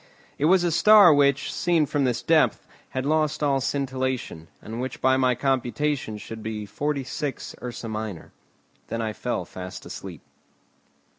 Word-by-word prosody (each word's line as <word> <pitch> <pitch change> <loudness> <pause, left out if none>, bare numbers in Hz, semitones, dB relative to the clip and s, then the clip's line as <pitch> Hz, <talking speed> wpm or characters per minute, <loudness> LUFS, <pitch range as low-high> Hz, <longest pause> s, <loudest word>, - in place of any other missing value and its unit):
It 145 - +2
was 180 +2 +5
a 175 - +1
star 205 -1 +7
which, 140 0 +2
seen 170 -3 +2
from 140 -1 0
this 125 -2 -1
depth, - - +3 0.2
had 130 0 -3
lost 155 0 +1
all 140 -2 +2
scintillation, 130 - -2
and 115 +2 -6
which 130 - -5
by 130 0 +3
my 130 -1 +2
computation 130 -1 -1
should 110 +1 -8
be 110 -1 -4
46; 140 +4 -3
Ursa 120 -1 -6
minor. 110 -5 -5 0.6
Then 115 - -4
I 110 -1 -2
fell - - -3
fast 90 0 -8
asleep. - - -8
130 Hz, 150 wpm, -25 LUFS, 115-150 Hz, 0.6 s, star